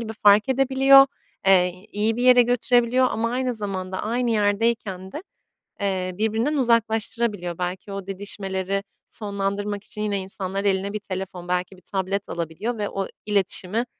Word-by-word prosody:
gibi 220 -1 -5
fark 205 +3 +6
edebiliyor, 270 +1 +6 0.4
eee, 185 0 +3
iyi 215 +2 0
bir 245 - -2
yere 250 -1 +7
götürebiliyor 245 +1 +3
ama 230 +1 -1
aynı 255 0 -1
zamanda 190 -3 -4
aynı 235 +2 0
yerdeyken 205 -3 0
de, 305 - -6 0.6
eee, 185 -2 -1
birbirinden 225 +7 0
uzaklaştırabiliyor. 225 -6 0
Belki 180 +3 -4
o 195 -1 -6
didişmeleri 195 0 -3 0.2
sonlandırmak 200 0 -3
için 210 - -5
yine 205 -2 -1
insanlar 190 0 -4
eline 195 +1 0
bir 215 - -2
telefon, 185 -3 -6
belki 180 +1 -2
bir - - -19
tablet 195 +1 -3
alabiliyor 170 +8 -4
ve 205 -1 -2
o 195 -1 -3 0.2
iletişimi, 205 +2 0
205 Hz, 145 wpm, -23 LUFS, 190-230 Hz, 0.6 s, yere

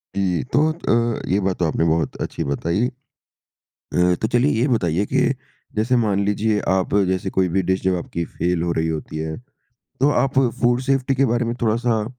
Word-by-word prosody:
जी, 95 -4 0
तो 155 +2 +4
अ, 120 -8 0
ये 95 +3 +2
बात 95 -2 -1
तो 90 - +2
आपने 80 +1 0
बहुत 80 0 0
अच्छी - - -3
बताई। 85 - 0
अ, - - -4 1.3
तो 110 - +1
चलिए 125 +4 +2
ये 125 - +3
बताइए 95 - +1
कि 135 -1 +3 0.5
जैसे 115 +4 +2
मान 100 -4 +1
लीजिए 105 +1 +1
आप 95 0 +1
जैसे 95 -1 -1
कोई 95 -1 +1
भी 95 +3 +1
डिश 95 +1 0
जब 95 0 +2
आपकी 85 -1 -4
फेल 85 +1 -1
हो 85 0 0
रही 80 -1 0
होती 80 -1 -4
है, 80 0 -3 0.6
तो 140 - +4
आप 135 0 +1 0.2
फूड 120 +1 +3
सेफ्टी 135 0 +1
के 135 +1 +2
बारे 120 -1 +1
में 120 0 -2
थोड़ा-सा 115 -1 +1
105 Hz, 190 wpm, -21 LUFS, 90-120 Hz, 1.3 s, तो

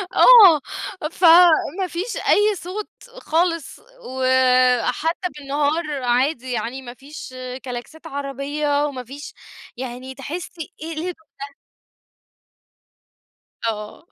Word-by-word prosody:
آه، 395 - +8 0.5
فما 350 +1 +5
فيش 365 +7 -4
أي 415 0 +3
صوت 380 +4 -6 0.3
خالص، 330 -1 -1 0.3
وحتى 255 +5 +2
بالنهار 290 0 -2
عادي 255 +1 0
يعني 240 +3 -3
ما 240 -1 -9
فيش 275 +1 -11 0.3
كلاكسات 255 +7 -8
عربية، 285 +1 -2
وما 260 -4 -5
فيش 280 +5 -10 0.4
يعني 255 +1 -7
تحسي 320 +4 -7
إيه 320 - -6
ليه 310 - -4
الهدوء 360 +1 -3 0.3
ده؟ 280 0 -8 2.1
آه. 210 +4 -7
285 Hz, 100 wpm, -21 LUFS, 255-330 Hz, 2.1 s, آه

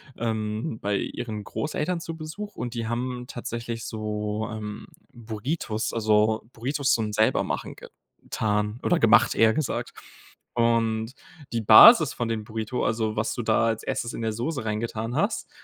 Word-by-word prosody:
ähm, 110 +2 -3
bei 100 0 -1
ihren 110 -3 -4
Großeltern 155 - -2
zu 165 -1 -6
Besuch, 165 +7 -7
und 125 0 -5
die 115 -1 -3
haben 125 +1 -3
tatsächlich 115 -1 -5
so, 105 0 -3
ähm, 105 -1 -6 0.3
Burritos, 110 0 -3
also 110 0 +2
Burritos 135 +3 0
zum 110 -2 -1
Selbermachen 110 +1 0 0.5
getan 105 +1 -1
oder - - +2
gemacht, - - +5
eher 110 0 +4
gesagt. 155 - -2 0.6
Und 115 0 +1 0.4
die 115 -1 -1
Basis 150 - +9
von 120 - -3
den 110 -2 -2
Burrito, 110 +3 -3
also 110 -1 0
was 110 - -1
du 120 - -3
da 110 0 +2
als 115 -1 0
Erstes 115 - -3
in - - -5
der 110 -1 -1
Soße 130 +4 -3
reingetan 110 +2 -3
hast, 200 +8 -1
115 Hz, 150 wpm, -25 LUFS, 110-125 Hz, 0.6 s, Basis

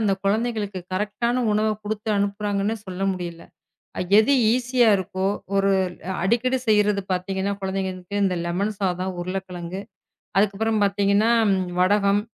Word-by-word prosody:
அந்தக் 195 -3 0
குழந்தைகளுக்கு 210 -2 -1
கரெக்ட்டான 235 +5 -1
உணவைக் 215 0 0
குடுத்து 215 +1 -4
அனுப்புறாங்கன்னு 200 +1 -1
சொல்ல 185 +1 -5
முடியல. 175 -2 -6 0.8
எது 240 +6 +4 0.2
ஈசியா 250 -1 +2
இருக்கோ 190 0 -3 0.3
ஒரு 195 0 +3 0.5
அடிக்கடி 240 +6 +1
செய்யறது 210 -1 +3
பாத்தீங்கன்னா 190 +2 -1
குழந்தைகளுக்கு 190 +1 -3
இந்த 185 -2 +1
லெமன் 200 +5 -1
சாதம், 185 0 -1
உருளைக்கிழங்கு 185 0 -5 0.6
அதுக்கப்புறம் 215 +2 +1
பாத்தீங்கன்னா 200 +2 +2 0.5
வடகம், 200 +1 +3
200 Hz, 110 wpm, -23 LUFS, 190-215 Hz, 0.8 s, எது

